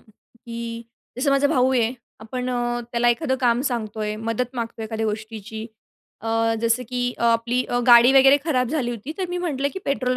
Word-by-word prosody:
की 230 +1 -9 0.4
जसं 275 +2 +1
माझा 275 +1 +3
भाऊ 260 -3 +2
आहे, 240 -2 +2 0.3
आपण 250 +3 -4
अ, 240 -1 -1
त्याला 240 0 +2
एखादं 260 +3 +1
काम 240 -1 +2
सांगतोय. 215 -2 -3
मदत 230 +3 -3
मागतोय, 230 -1 -4
एखाद्या 220 0 -3
गोष्टीची. 220 0 -5 0.5
अ, 225 0 0
जसं 230 +2 +1
की 245 0 -1
अ, - - -5
आपली 235 +2 +2
अ, 245 - 0
गाडी 240 +1 +8
वगैरे 270 +1 +7
खराब 255 -7 +1
झाली 270 -5 -1
होती. 240 +6 -6
तर 370 - -1
मी 355 0 -3
म्हटलं, 285 -6 -1
की 380 - -5
पेट्रोल 255 -2 0
240 Hz, 185 wpm, -23 LUFS, 225-255 Hz, 0.5 s, गाडी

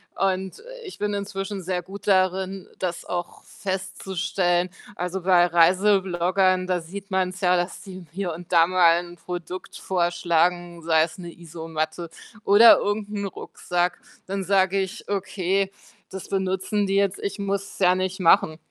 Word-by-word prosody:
und 190 - -1 0.2
ich 385 - -9
bin 205 0 -2
inzwischen 195 0 -4
sehr 180 0 -2
gut 195 +3 -11
darin, 190 0 +1
das 180 -2 -3
auch 175 -1 -5
festzustellen. 185 -2 -2 0.3
Also, 180 +1 -3
bei 180 -1 +5
Reisebloggern, 185 +1 +3
da 180 -1 +1
sieht 195 +4 -9
man's 185 0 -1
ja, 180 -1 +4
dass 175 +1 -3
die 185 -2 -10
hier 185 -2 -3
und 175 +2 -10
da 165 -1 +7
mal 175 -2 +5
'n 175 0 -12
Produkt 180 +1 -7
vorschlagen, 175 -1 0
sei 160 -1 +4
es 165 - -5
'ne 175 -2 -8
Isomatte 165 0 -5 0.4
oder 215 +4 +8
irgend 205 0 -2
'n 200 -1 -2
Rucksack. 180 -1 -2 0.3
Dann 195 0 -3
sage 195 0 +3
ich: 190 0 -5
„Okay, 195 0 -1 0.4
das 190 -1 -8
benutzen 190 +1 -1
die 195 - 0
jetzt. 200 -1 +1
Ich 200 +1 -4
muss 200 0 -1
es - - -13
ja 180 -1 +4
nicht 185 +1 -2
machen.“ 160 -2 +4
185 Hz, 155 wpm, -24 LUFS, 175-195 Hz, 0.4 s, oder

